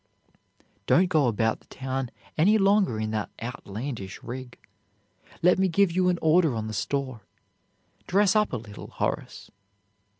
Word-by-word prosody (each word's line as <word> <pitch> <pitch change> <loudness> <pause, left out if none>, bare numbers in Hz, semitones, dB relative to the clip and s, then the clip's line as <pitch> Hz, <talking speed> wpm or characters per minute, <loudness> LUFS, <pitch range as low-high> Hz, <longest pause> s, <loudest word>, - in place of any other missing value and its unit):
"Don't 180 +1 +4
go 155 -6 +3
about 110 -1 0
the - - -27
town 130 -1 -4 0.3
any 200 +8 +4
longer 195 - +3
in 110 0 -2
that 110 -2 -2
outlandish 115 -2 -6
rig. 125 +1 -7 0.9
Let 180 +2 +5
me 190 - +3
give 185 +1 +3
you 180 +1 +2
an 180 - +1
order 160 -4 +4
on 110 -1 -3
the 110 - -5
store. 130 0 -3 0.9
Dress 200 +2 +3
up 210 -1 +3
a 125 - -2
little, 105 -2 -10
Horace." - - -4
135 Hz, 145 wpm, -26 LUFS, 115-180 Hz, 0.9 s, Let